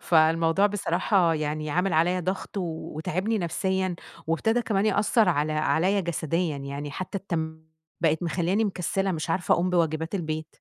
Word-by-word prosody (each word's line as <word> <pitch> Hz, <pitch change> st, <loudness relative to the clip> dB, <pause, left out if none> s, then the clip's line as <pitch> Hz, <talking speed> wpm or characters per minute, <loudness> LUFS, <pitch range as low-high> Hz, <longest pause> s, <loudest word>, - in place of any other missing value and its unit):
فالموضوع 165 Hz, +3 st, +4 dB
بصراحة 185 Hz, -3 st, +1 dB
يعني 155 Hz, 0 st, -2 dB
عامل 180 Hz, +3 st, +1 dB
عليّا 175 Hz, +3 st, +2 dB
ضغط 185 Hz, +3 st, -4 dB
وتاعبني 175 Hz, +4 st, -2 dB
نفسيًا، 190 Hz, +1 st, -1 dB, 0.3 s
وابتدى 225 Hz, +9 st, +1 dB
كمان 205 Hz, -2 st, +1 dB
يأثّر 215 Hz, 0 st, +3 dB
على 155 Hz, -2 st, +1 dB
عليّا 175 Hz, +6 st, +2 dB
جسديًا 165 Hz, -2 st, -1 dB
يعني 140 Hz, +1 st, -5 dB
حتى 185 Hz, +5 st, -4 dB
التم 160 Hz, -4 st, -4 dB, 0.4 s
بقت 160 Hz, 0 st, +2 dB
مخلياني 175 Hz, +5 st, +1 dB
مكسلة 195 Hz, 0 st, -1 dB
مش 160 Hz, +1 st, -3 dB
عارفة 170 Hz, -1 st, +2 dB
أقوم 180 Hz, +1 st, 0 dB
بواجبات 160 Hz, 0 st, 0 dB
البيت. 155 Hz, -4 st, -3 dB
170 Hz, 140 wpm, -26 LUFS, 160-190 Hz, 0.4 s, فالموضوع